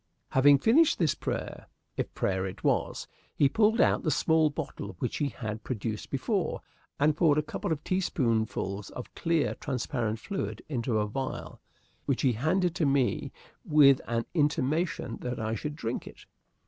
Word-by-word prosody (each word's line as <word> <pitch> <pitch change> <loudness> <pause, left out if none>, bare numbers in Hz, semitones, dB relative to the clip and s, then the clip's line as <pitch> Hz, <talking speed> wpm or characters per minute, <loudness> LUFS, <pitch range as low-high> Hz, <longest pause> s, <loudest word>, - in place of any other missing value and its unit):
Having 140 +2 +6
finished 265 - +4
this 160 -5 +2
prayer, - - -5 0.3
if - - -3
prayer 95 0 0
it 95 - -9
was, - - 0 0.3
he 140 - +4
pulled 220 - +3
out - - +4
the 155 - 0
small 160 +1 +3
bottle 140 - -6
which 120 - -2
he 145 -2 0
had 110 -3 -6
produced 110 -3 -4
before, 160 - -1 0.4
and 150 +1 +3
poured 155 -2 +4
a 150 - +2
couple 180 +4 -4
of 150 -2 -2
teaspoonfuls 110 - -1
of 125 - -9
clear, 165 -2 +1
transparent 120 -4 -2
fluid 195 - -4
into 120 -5 -1
a 105 - +1
vial, 130 +5 -5 0.5
which 135 - 0
he 130 -3 +4
handed 165 - +1
to 175 -4 0
me 135 -2 +1 0.3
with 140 -3 +6
an 115 0 -1
intimation 150 -3 0
that 125 -1 -4
I 110 0 -2
should 145 +7 -4
drink 115 -4 -4
it. - - -12
140 Hz, 160 wpm, -29 LUFS, 115-160 Hz, 0.5 s, Having